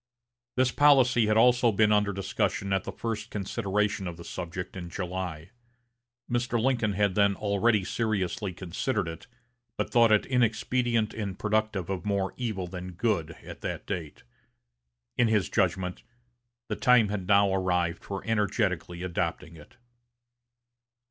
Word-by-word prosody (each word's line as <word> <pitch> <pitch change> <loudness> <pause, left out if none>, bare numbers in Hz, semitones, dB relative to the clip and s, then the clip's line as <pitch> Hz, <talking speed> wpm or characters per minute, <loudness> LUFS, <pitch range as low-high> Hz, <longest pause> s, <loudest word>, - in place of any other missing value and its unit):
This 130 -1 +2
policy 130 -6 +5
had 110 +1 +3
also 125 0 +5
been 105 +1 +3
under 105 -1 +3
discussion 95 0 -1
at 95 - 0
the - - -4
first 110 -1 -4
consideration 100 0 -1
of 85 -1 -6
the 85 - -9
subject 90 +2 -6
in 90 -2 -6
July. 90 -2 -5 0.8
Mr. 120 0 0
Lincoln 115 -4 +1
had 100 -1 +1
then 100 0 +3
already 105 +1 +1
seriously 105 -2 -1
considered 95 +3 -2
it, 80 0 -8 0.5
but - - -2
thought 115 -2 +5
it 105 - +4
inexpedient 120 -1 +1
and 100 -4 -4
productive 105 -4 0
of 90 -3 -3
more 100 -2 -1
evil 110 -7 -3
than 90 0 -7
good 90 -5 -1
at - - -10
that - - -4
date. 85 -7 -5 1.0
In 120 - +5
his 105 -8 +1
judgment, 90 +3 0 0.7
the - - -2
time 125 -4 +4
had 100 -3 -3
now 100 -1 +4
arrived 90 -2 0
for 100 -1 -5
energetically 100 -5 -1
adopting 85 -1 -3
it. 75 -2 -16
100 Hz, 140 wpm, -28 LUFS, 90-110 Hz, 1.0 s, policy